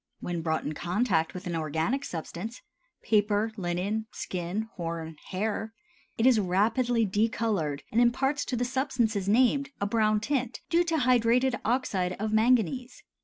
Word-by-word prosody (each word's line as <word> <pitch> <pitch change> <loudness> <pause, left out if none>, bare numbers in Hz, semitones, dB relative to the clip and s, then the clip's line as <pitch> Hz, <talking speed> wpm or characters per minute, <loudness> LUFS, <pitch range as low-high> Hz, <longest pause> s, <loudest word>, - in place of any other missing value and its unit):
When 175 -1 -3
brought 160 -1 -1
in 150 - -3
contact 175 0 0
with 180 +2 -7
an 175 -2 -2
organic 160 - -1
substance—paper, 210 - -2
linen, 195 +3 -2
skin, 180 +3 -3
horn, 165 -2 -4
hair—it 220 - -4
is 255 -4 +6
rapidly 225 +5 +2
decolored 205 -7 0
and 230 - +3
imparts 270 +4 +2
to 255 - -2
the 245 +1 0
substances 240 -6 0
named 260 +5 +3
a 200 - 0
brown 215 0 +2
tint 250 +1 -2
due 340 +1 +4
to 330 -1 0
hydrated 250 -1 +3
oxide 205 -7 0
of 215 +3 -3
manganese. 245 +2 +1
220 Hz, 135 wpm, -28 LUFS, 180-245 Hz, -, is